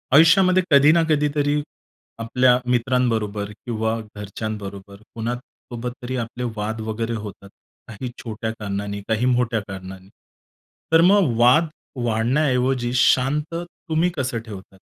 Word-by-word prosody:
आयुष्यामध्ये 185 +3 +6
कधी 140 +2 +7
ना 170 0 +4
कधीतरी 145 -1 +1 0.6
आपल्या 125 +2 +3
मित्रांबरोबर 115 -5 0 0.2
किंवा 110 -1 -1 0.2
घरच्यांबरोबर, 100 -1 -6 0.2
कुणासोबत 120 +1 -6
तरी 130 +1 -3
आपले 125 +2 -7
वाद 110 +1 -3
वगैरे 115 +1 -2
होतात, 100 -2 -8 0.4
काही 110 +4 -6
छोट्या 110 -1 -4
कारणांनी, 100 0 -4
काही 110 +2 +1
मोठ्या 125 -2 +2
कारणांनी, 95 0 -9 0.8
तर 165 - +7
मग 185 - +3
वाद 130 +8 +5 0.4
वाढण्याऐवजी 125 +1 +1
शांत 135 +5 +2
तुम्ही 170 0 -2
कसं 130 -3 -1
ठेवतात? 95 -2 -10
120 Hz, 115 wpm, -22 LUFS, 110-140 Hz, 0.8 s, कधी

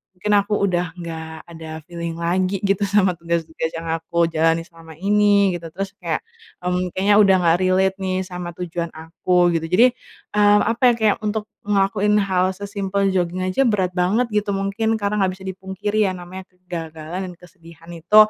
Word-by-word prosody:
mungkin 210 +3 -2
aku 200 +1 -2
udah 180 -2 +1
nggak 160 -2 -7
ada 165 -1 -11 0.2
feeling 170 0 -5
lagi 185 +3 -1
gitu 200 0 +1
sama 195 -1 +3
tugas-tugas 165 -1 -2
yang 165 - -5 0.2
aku 170 +1 0
jalanin 165 +1 +2
selama 165 -2 -15
ini, 200 0 +3
gitu. 165 - -7
Terus 195 +4 -5
kayak, 165 -3 -2 0.4
mmm, 180 0 0
kayaknya 200 +2 +3
udah 195 -2 +6
nggak 165 0 +4
relate 190 +1 +2
nih 185 -1 -1
sama 180 -1 -6
tujuan 170 -1 -3
aku, 175 +2 +1
gitu. 160 - -6
Jadi, 225 +7 +7 0.5
mmm, 205 0 +5
apa 230 - -6
ya, - - +4
kayak 215 -2 +3
untuk 210 0 -2 0.2
ngelakuin 205 +1 +2
hal 185 -2 +1
sesimpel 200 0 -1
joging 180 -1 -1
aja 185 +9 +1
berat 195 -5 +1
banget 210 +7 +2
gitu, 210 -1 0
mungkin 195 +3 -1
karena 205 +1 0
nggak 190 -1 +2
bisa 190 - -14
dipungkiri 190 +3 -1
ya, - - 0
namanya 185 +1 -9
kegagalan 170 -2 -7
dan 180 - -8
kesedihan 170 -2 -16
itu, 170 +4 -2
185 Hz, 175 wpm, -21 LUFS, 170-200 Hz, 0.5 s, Jadi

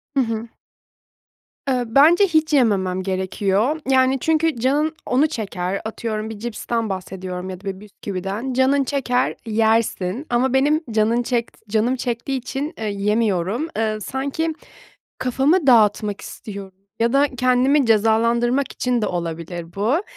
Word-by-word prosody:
Hı - - +3
hı. 230 -2 -1 1.2
Eee, 255 -2 +1
bence 305 - +5
hiç 315 -2 +1
yememem 190 -8 +2
gerekiyor. 195 - 0
Yani, 260 0 +4
çünkü 320 0 +1
canın 295 +6 +1
onu 275 +5 +3
çeker, 195 - -3
atıyorum 220 -1 -4
bir 220 -2 -8
cipsten 230 -1 -3
bahsediyorum 185 -1 -5
ya 185 0 -7
da 195 -2 -5
bisküviden. 205 +3 -5
Canın 265 +2 +3
çeker, 255 -2 0
yersin 220 +1 +1
ama 245 +2 +1
benim 295 +4 +3
canın 225 +2 +2
çekt 235 -2 -3
canım 225 +4 +1
çektiği 245 +2 -2
için, 270 +5 -4
eee, 220 - -4
yemiyorum, 205 - 0
eee, 215 -1 0
sanki 280 +7 -2 0.7
kafamı 270 +6 +2
dağıtmak 210 -4 +4
istiyorum 200 -3 -9 0.3
ya 235 +1 +2
da 280 +1 +4
kendimi 255 +2 +3
cezalandırmak 230 +4 +2
için 245 -3 -1
de - - +1
olabilir 170 0 -4
bu. 240 - +1
230 Hz, 130 wpm, -21 LUFS, 205-265 Hz, 1.2 s, bence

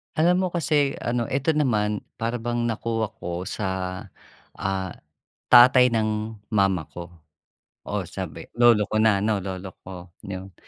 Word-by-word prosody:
Alam 180 +4 +3
mo - - 0
kasi 145 -4 +1
ano 120 0 -1
ito 135 +6 -1
naman, 105 -7 +1 0.2
para 115 +2 -1
bang 120 0 -2
nakuha 115 -1 -2
ko 90 -2 -5
sa, 95 -2 -3 0.6
ah, 95 -2 -3 0.6
tatay 125 +1 +8
ng 110 -1 -1 0.2
mama 95 -5 +2
ko. 85 0 -8 0.8
Oo, - - -2
sabi - - -7
lolo 120 -3 +5
ko 110 - 0
na 110 -2 +4
'no? 105 -2 +1
Lolo 95 -1 -6
ko. 90 -2 -10
'Yon. 95 -1 -7
110 Hz, 140 wpm, -24 LUFS, 95-120 Hz, 0.8 s, tatay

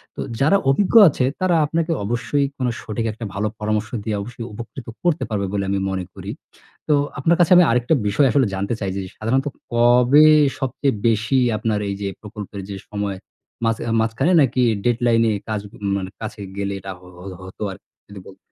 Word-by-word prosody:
তো - - -5 0.2
যারা 155 +8 +5
অভিজ্ঞ 190 +11 +1
আছে 130 -3 0 0.2
তারা 185 -2 +3
আপনাকে 165 +2 -1
অবশ্যই 125 +5 0
কোনো 125 -2 0
সঠিক 115 +1 -4
একটা 115 +1 -7
ভালো 105 +1 -1
পরামর্শ 110 0 -1
দিয়ে, 110 -1 -2
অবশ্যই 115 +2 -7
উপকৃত 120 +4 -9 0.2
করতে 175 -2 +1
পারবে 100 -2 -1
বলে 100 -1 0
আমি 100 0 0
মনে 95 -1 -3
করি। - - -7 0.6
তো 150 - +3 0.3
আপনার 165 +4 +3
কাছে 175 -1 +3
আমি 180 - +8
আরেকটা 120 +5 +2
বিষয় 105 +8 +3
আসলে 135 -5 +3
জানতে 100 +4 -2
চাই 95 -2 -2
যে, 100 - -2 0.2
সাধারণত 130 +6 0 0.3
কবে 125 +5 +5 0.3
সবচেয়ে 135 +1 -1
বেশি 115 +4 +1 0.2
আপনার 105 -1 -1
এই 100 - -1
যে 100 - -2
প্রকল্পের 105 -2 -8
যে, 100 - -5
সময়। 100 -2 -3 0.5
মাঝ 115 0 +2 0.3
মাঝখানে 115 +10 +1
নাকি 130 -2 +2 0.2
ডেডলাইন 120 -1 +2
এ - - 0 0.2
কাজ 105 -2 -1 0.4
মানে 95 -1 -4
কাছে 110 -1 -6 0.2
গেলে, 100 0 -2
এটা 95 +1 -7
হো 90 - -16
হ - - -12 0.2
হতো 95 +3 -8
আরকি - - -17 0.2
যদি 100 -1 -9
বলতেন? 95 - -13
115 Hz, 185 wpm, -21 LUFS, 105-135 Hz, 0.6 s, আমি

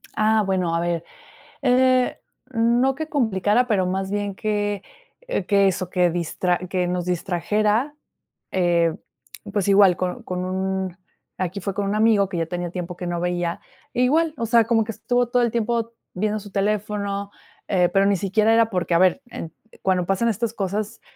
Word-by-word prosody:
Ah, 215 0 +3
bueno, 185 -3 0
a - - +1
ver, 170 -1 -1 0.6
eh, 255 -1 +3 0.3
no 240 +3 +2
que 315 +2 -4
complicara, 225 - +2
pero 200 -6 +2
más 190 +1 -2
bien, 205 -1 -2
que 205 -1 -1 0.4
e - - -2
que 200 0 +4
eso, 185 -1 -3
que 180 -1 +2
distra 175 +1 0
que 180 -1 0
nos 180 0 -2
distrajera, 210 - 0 0.6
eh, 170 -3 +2 0.6
pues, 200 -1 0
igual, 195 -2 +6
con 185 +7 -3
con 180 -3 -3
un 190 0 -2 0.4
aquí 185 +1 -3
fue 195 - -3
con 200 +1 -2
un 200 +1 -1
amigo, 215 -3 +3
que 185 - -4
ya 165 - 0
tenía 175 0 -3
tiempo 180 -1 -5
que 180 - -5
no 175 0 -2
veía. 175 +1 -1 0.3
Igual, 305 +6 +2
o 235 - -1
sea, 230 0 +4
como 225 0 +2
que, 225 - -5
estuvo 245 +3 0
todo 245 +1 +2
el 235 - +1
tiempo 230 0 -1 0.2
viendo 210 +3 -1
su 205 -1 -12
teléfono, 200 0 -1 0.4
eh, 180 -3 +2
pero 195 0 +3
ni 200 -1 +3
siquiera 210 +4 +2
era, 225 0 +4
porque, 180 -4 -1
a 170 - +4
ver, 185 +8 +3
eh, 165 - -6 0.3
cuando 185 -2 +1
pasan 195 +6 +1
estas 230 +1 -1
cosas, 205 +1 -3
200 Hz, 180 wpm, -23 LUFS, 180-225 Hz, 0.6 s, igual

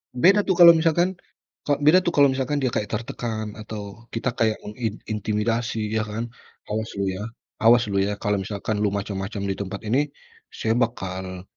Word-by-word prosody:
Beda, 185 +11 +5
tuh, 190 - +3
kalau 170 -1 +10
misalkan 170 +3 +2 0.5
Kak, 145 0 +1
beda, 155 +5 +7
tuh, 175 -2 -2
kalau 140 -2 +6
misalkan 135 +2 -1
dia 130 - +1
kayak 105 - -1
tertekan 110 -1 -4
atau 105 +1 -8
kita 115 +2 -1
kayak 110 -2 +1
mengin 105 0 -4
intimidasi 110 +1 -1
ya, 110 - +1
kan, 115 +3 -4 0.3
"Awas 110 +1 -4
lu, 100 -1 -1
ya, 100 +4 -5 0.3
awas 115 +2 +6
lu, 100 - +1
ya, 100 +1 0
kalau 105 0 -1
misalkan 105 +2 -3
lu 105 - +2
macem-macem 100 0 -3
di 100 - -1
tempat 100 +2 -5
ini 130 +7 +1 0.4
saya 110 - -3
bakal 95 -6 -3
110 Hz, 175 wpm, -24 LUFS, 105-125 Hz, 0.5 s, kalau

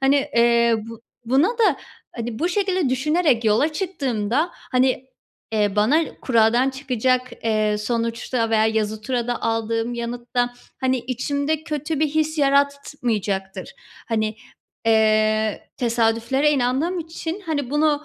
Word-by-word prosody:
Hani, 270 +1 +4 0.2
eee, 235 0 +4
bu 230 0 -10 0.2
buna 270 - +3
da, 450 - +2 0.4
hani, 235 -1 -4
bu 345 - +1
şekilde 375 -4 0
düşünerek 265 -1 +1
yola 225 +9 +3
çıktığımda, 285 - -1
hani, 255 0 0 0.5
eee, 210 -2 +1
bana 270 +11 +3 0.2
kuradan 240 +2 +3
çıkacak, 255 -1 0
eee, 215 -1 +1
sonuçta 230 +1 -1
veya 220 -1 +3
yazı 220 -1 -1
turada 245 0 -2
aldığım 225 +1 -1
yanıtta, 245 +1 -2 0.3
hani, 260 -1 +1
içimde 285 +5 -2
kötü 300 -1 -3
bir 310 - +3
his 310 +1 -1
yaratmayacaktır. 245 - 0 0.3
Hani, 220 -1 -1 0.5
eee, 215 -1 +2
tesadüflere 235 +4 +1
inandığım 285 +6 0
için, 330 +3 -5
hani, 285 -5 -2
bunu 300 0 +1
250 Hz, 120 wpm, -22 LUFS, 225-290 Hz, 0.5 s, Hani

